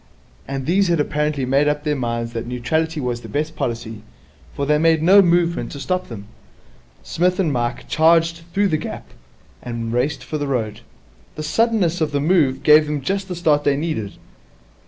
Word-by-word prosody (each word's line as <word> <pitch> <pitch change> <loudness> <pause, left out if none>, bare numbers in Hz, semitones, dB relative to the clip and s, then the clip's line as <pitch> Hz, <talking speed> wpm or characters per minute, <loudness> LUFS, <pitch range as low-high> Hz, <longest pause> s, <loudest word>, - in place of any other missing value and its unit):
And 135 -1 -4
these 190 +5 +2
had 170 -2 +1
apparently 150 -2 -1
made 135 +3 +2
up 150 0 0
their 150 -1 0
minds 115 -2 -3
that 115 0 -4
neutrality 155 +7 -1
was 125 -3 -3
the - - -10
best 155 +2 -3
policy, 115 -5 -4 0.5
for 140 - -3
they 150 +1 +2
made 160 -1 +3
no 195 +4 +7
movement 175 -1 +1
to 140 - -7
stop 185 +5 -2
them. 105 -4 -9 0.8
Psmith 180 +2 0
and 165 -6 +1
Mike 120 -1 -3
charged 165 +1 +3
through 200 +1 +1
the 155 - +1
gap, 155 - -7 0.5
and 115 -2 -5
raced 130 +2 -1
for 155 +3 -4
the 145 - -2
road. 115 -6 -2 0.6
The 155 - -5
suddenness 180 -1 +1
of 155 -2 0
the 140 - +1
move 150 -4 +2
gave 150 0 +6
them 150 -1 -2
just 195 +6 -2
the 180 - -5
start 155 -4 +2
they 140 -1 +2
needed. 140 -11 -3
150 Hz, 185 wpm, -20 LUFS, 130-165 Hz, 0.8 s, no